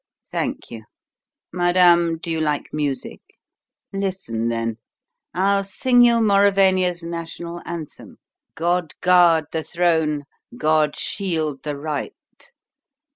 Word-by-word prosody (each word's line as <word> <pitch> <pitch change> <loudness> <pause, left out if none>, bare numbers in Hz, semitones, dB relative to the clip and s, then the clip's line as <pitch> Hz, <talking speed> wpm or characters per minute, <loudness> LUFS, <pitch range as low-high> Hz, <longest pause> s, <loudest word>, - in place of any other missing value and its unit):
Thank - - -3
you. 110 -2 -9 0.7
Madame, 175 -2 +4
do 165 +1 -6
you 160 -1 -1
like 150 -2 -1
music? 145 -3 -3 0.7
Listen, 185 - -2
then: 115 -1 -3 0.6
I'll 195 +2 +2
sing 245 +6 +2
you 240 -1 +6
Mauravania's 195 -4 +3
national 170 0 -6
anthem: 165 -3 -8 0.4
'God 175 -1 -1
guard 175 -3 +5
the 160 - -2
throne; 160 -3 0 0.3
God 155 -1 +2
shield 160 -8 -2
the 150 -2 -4
right!'" 150 0 -4
170 Hz, 105 wpm, -21 LUFS, 150-185 Hz, 0.7 s, you